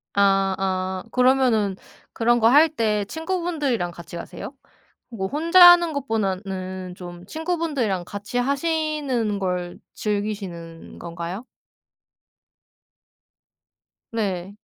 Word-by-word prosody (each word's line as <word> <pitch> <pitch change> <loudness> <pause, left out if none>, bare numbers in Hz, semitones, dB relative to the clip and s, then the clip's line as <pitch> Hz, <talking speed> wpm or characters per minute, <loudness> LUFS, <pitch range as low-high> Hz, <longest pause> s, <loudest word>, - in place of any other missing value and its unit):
아 195 -1 +3
아 185 -1 -2
그러면은 250 -6 +3 0.4
그런 240 +1 +2
거 225 - +5
할 295 +7 +6
때 215 -8 0
친구분들이랑 320 - -2
같이 170 0 -11
가세요? 170 +9 -7 0.6
뭐 205 -6 -4
혼자 335 - +8
하는 345 -2 +4
것보다는 190 -7 -3
좀 175 -1 -10
친구분들이랑 310 - -2
같이 205 +5 -7
하시는 280 -5 -1
걸 180 -2 -3 0.2
즐기시는 200 -6 -4
건가요? 170 +6 -6 2.7
네. 200 -4 -3
210 Hz, 210 characters per minute, -23 LUFS, 185-280 Hz, 2.7 s, 혼자